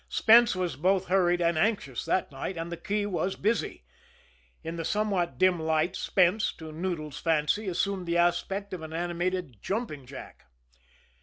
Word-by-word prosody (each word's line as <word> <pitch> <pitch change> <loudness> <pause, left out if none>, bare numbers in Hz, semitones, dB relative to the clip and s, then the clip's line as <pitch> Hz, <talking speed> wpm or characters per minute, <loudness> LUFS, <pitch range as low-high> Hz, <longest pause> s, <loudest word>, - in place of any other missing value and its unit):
Spence 230 -1 +5
was 180 -5 -2
both 185 +4 +1
hurried 175 -2 +3
and 170 -2 +2
anxious 175 - 0
that 185 - 0
night 140 +7 -5
and 165 +1 -5
the - - -2
key 205 +3 -2
was 190 -1 -1
busy. 210 - -1 0.8
In 165 +1 -5
the 165 - -4
somewhat 195 -1 0
dim 185 -2 +3
light, 160 +3 +1
Spence, 185 +3 +2
to 160 -1 -9
Noodles' 155 -3 -4
fancy, 165 +6 +1
assumed 185 0 -1
the 170 0 +1
aspect 175 +3 0
of 180 - -5
an 160 0 -8
animated 175 - -3
jumping 190 - -4
jack. 125 - -11
175 Hz, 160 wpm, -28 LUFS, 160-195 Hz, 0.8 s, Spence